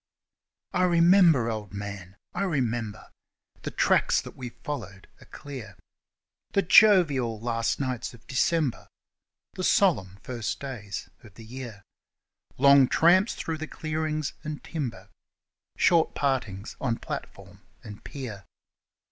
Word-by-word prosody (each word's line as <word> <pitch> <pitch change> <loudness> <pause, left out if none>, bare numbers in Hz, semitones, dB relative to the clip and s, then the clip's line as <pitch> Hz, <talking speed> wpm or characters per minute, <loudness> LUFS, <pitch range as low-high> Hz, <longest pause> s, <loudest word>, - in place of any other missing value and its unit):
I 180 - +1
remember, 170 -6 +5
Old 105 -3 -6
Man, 100 -2 -7 0.2
I - - -3
remember 120 - -2 0.5
The - - -4
tracks - - +2
that - - -9
we 125 -2 -6
followed 105 -8 -7
are - - -14
clear 125 -9 -9 0.8
The 200 - +3
jovial 155 - +5
last 115 0 -1
nights 130 -4 -3
of 115 - -20
December, 145 0 0 0.7
The 185 - -5
solemn 105 - +2
first 120 -3 -4
days 110 -8 -6 0.2
of 105 -5 -16
the 115 - -12
year, 115 -4 -9 0.7
Long 140 0 +7
tramps 185 - +4
through 160 -1 -4
the 155 - -5
clearings 155 -2 -3
and 155 -1 -6
timber, 140 -9 -5 0.7
Short 170 -3 +3
partings 120 -8 -2
on 115 -2 0
platform - - -8 0.2
and 105 -1 -10
pier. 115 -9 -7
130 Hz, 120 wpm, -27 LUFS, 110-155 Hz, 0.8 s, Long